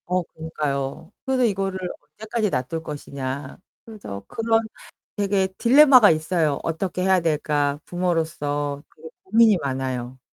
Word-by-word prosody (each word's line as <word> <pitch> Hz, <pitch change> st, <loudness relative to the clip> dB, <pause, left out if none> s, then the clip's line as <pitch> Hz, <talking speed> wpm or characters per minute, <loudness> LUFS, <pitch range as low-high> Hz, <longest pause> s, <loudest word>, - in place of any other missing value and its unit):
어 180 Hz, 0 st, 0 dB
그니까요. 150 Hz, -3 st, -4 dB
그래서 260 Hz, -1 st, +1 dB
'이거를 195 Hz, -3 st, -1 dB, 0.4 s
언제까지 215 Hz, 0 st, -1 dB
놔둘 160 Hz, +3 st, -3 dB
것이냐?' 140 Hz, -2 st, -6 dB, 0.3 s
그래서 200 Hz, -, -8 dB
그런 225 Hz, 0 st, +1 dB, 0.6 s
되게 195 Hz, -2 st, +1 dB
딜레마가 255 Hz, -2 st, +7 dB
있어요. 155 Hz, -2 st, +1 dB
'어떻게 180 Hz, +3 st, -2 dB
해야 190 Hz, 0 st, +3 dB
될까?' 150 Hz, -3 st, 0 dB
부모로서 150 Hz, -5 st, -2 dB
되게 160 Hz, +1 st, -11 dB, 0.2 s
고민이 220 Hz, 0 st, +5 dB
많아요. 130 Hz, -2 st, -3 dB
165 Hz, 310 characters per minute, -23 LUFS, 145-200 Hz, 0.6 s, 딜레마가